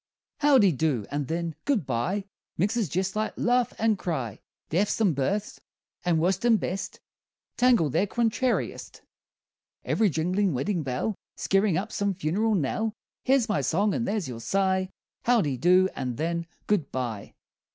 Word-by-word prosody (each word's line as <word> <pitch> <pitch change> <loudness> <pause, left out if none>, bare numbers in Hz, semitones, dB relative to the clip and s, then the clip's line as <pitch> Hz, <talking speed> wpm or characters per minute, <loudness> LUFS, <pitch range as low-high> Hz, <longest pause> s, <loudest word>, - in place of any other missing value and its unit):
Howdy 270 -10 +5
do, 140 -7 0
and 145 -1 -2
then, 165 0 -2
good 250 - +1
bye 155 - -1 0.3
Mixes 210 +1 +1
jest 190 +4 -1
like 215 0 -1
laugh 245 0 +2
and 220 -2 +1
cry; 130 - -3 0.3
Deaths 195 +8 +1
and 200 -7 +3
births, 195 +10 -2 0.4
and 175 -2 +2
worst 180 +4 +1
and 230 -3 +4
best 190 +2 -4 0.6
Tangled 235 - +4
their 205 - +2
contrariest; 235 +4 -1 0.8
Ev'ry 220 -2 +2
jinglin' 180 +4 0
weddin' 175 +7 -1
bell 135 - -2 0.2
Skeerin' 195 -2 +2
up 210 +3 -3
some 200 -1 -1
funeral 195 +6 +1
knell. 210 +7 -1 0.3
Here's 260 -3 +3
my 210 -9 +1
song, 195 +9 +1
and 235 - -1
there's 205 -5 -1
your 120 -3 -6
sigh: 190 +5 +1 0.4
Howdy 205 - +2
do, 180 +7 +5
and 125 -3 -4
then, 170 +1 -2 0.2
good 190 -9 0
bye! 120 -6 -4
190 Hz, 150 wpm, -27 LUFS, 155-215 Hz, 0.8 s, Howdy